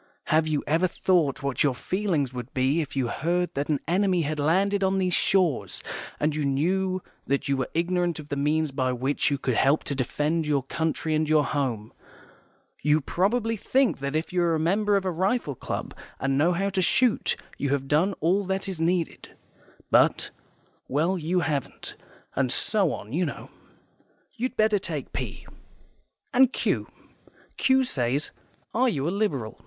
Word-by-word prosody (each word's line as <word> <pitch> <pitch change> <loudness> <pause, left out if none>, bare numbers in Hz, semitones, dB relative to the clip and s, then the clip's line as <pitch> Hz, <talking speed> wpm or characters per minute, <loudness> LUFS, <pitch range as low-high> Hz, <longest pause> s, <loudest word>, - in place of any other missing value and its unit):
HAVE 155 0 +4
YOU 150 -2 0
EVER 165 +5 +2
THOUGHT 165 -6 +1
what 140 -2 -1
your 140 -4 +3
feelings 170 -5 -1
would 125 0 -6
be 135 +5 +2
if 145 - -6
you 130 -3 +1
heard 175 +8 -1
that 140 +2 -2
an 150 -2 +1
enemy 185 0 +2
had 150 +1 -2
landed 195 +7 +2
on 190 0 +2
these 185 -2 +1
shores, 165 - +1 0.4
and 150 0 +1
you 155 - -1
knew 185 +7 0 0.2
that 140 0 0
you 140 - +2
were 130 -1 -2
ignorant 175 0 +1
of 150 -2 -9
the 140 - -2
means 150 +2 +1
by 130 -1 0
which 130 +4 0
you 140 - 0
could 130 -1 -1
help 140 +6 +3
to - - -2
defend 150 +5 -1
your 145 -3 +1
country 160 +3 -2
and 155 0 +1
your 155 -2 +4
home? 120 -7 -2 0.9
YOU 150 +2 +3
PROBABLY 220 - 0
THINK 260 - +1
that 140 +2 -3
if 160 +3 -2
you 180 - +2
are 170 -1 +2
a - - 0
member 200 +5 +2
of 195 - -2
a 185 - +1
rifle 190 - 0
club, - - -5 0.3
and 135 0 0
know 155 +6 +3
how 195 +3 0
to 190 -1 0
shoot, 240 +6 +2 0.2
you 140 - 0
have 135 -1 0
done 160 +8 +2
all 185 +6 +2
that 190 +1 -2
is 185 -4 -4
needed. 170 0 -1 0.6
But - - +3 0.6
well, 160 +7 +1
you 175 +1 0
haven't, 145 -5 -3 0.4
and 130 -2 +1
so 200 -2 +2
on, 105 +4 -7
you 175 +4 +1
know. 155 - -5 0.8
You'd 255 +2 -3
better 215 -1 +3
take 160 -7 -5
P. - - -5 0.9
And 260 0 +5
Q. - - -1 0.7
Q 265 0 +4
says 135 - -1 0.4
'Are 255 +2 +3
you 145 - -1
a - - +1
Liberal? 145 - -2
160 Hz, 180 wpm, -26 LUFS, 140-190 Hz, 0.9 s, And